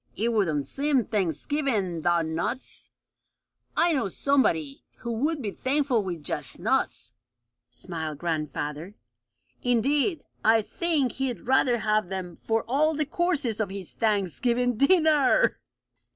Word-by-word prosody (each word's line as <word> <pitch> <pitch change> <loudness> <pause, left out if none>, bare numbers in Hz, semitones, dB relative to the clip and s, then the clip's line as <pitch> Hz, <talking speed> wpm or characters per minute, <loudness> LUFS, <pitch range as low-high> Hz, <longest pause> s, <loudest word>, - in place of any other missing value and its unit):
"It 230 +2 0
wouldn't 160 -10 +1
seem 275 - +1
Thanksgivingy 200 - -1
'thout 170 0 +2
nuts." 165 +11 -4 0.9
"I 340 0 +4
know 260 -8 0
somebody 170 - +1
who 235 -1 -5
would 290 +5 -1
be 205 - -2
thankful 265 -2 +1
with 175 -5 -5
just - - -2
nuts," - - -1 0.6
smiled 160 -4 -5
grandfather. 155 +2 -3 0.7
"Indeed, 275 - +1 0.2
I 225 0 +5
think 295 0 0
he'd 265 -3 -3
rather 255 -1 +3
have 215 -4 0
them 185 -3 -5
for 225 0 0
all 305 +5 +2
the 305 0 0
courses 300 - -1
of 215 -3 0
his 195 -2 -7
Thanksgiving 230 +4 +1
dinner!" 310 - +4
225 Hz, 125 wpm, -26 LUFS, 180-275 Hz, 0.9 s, I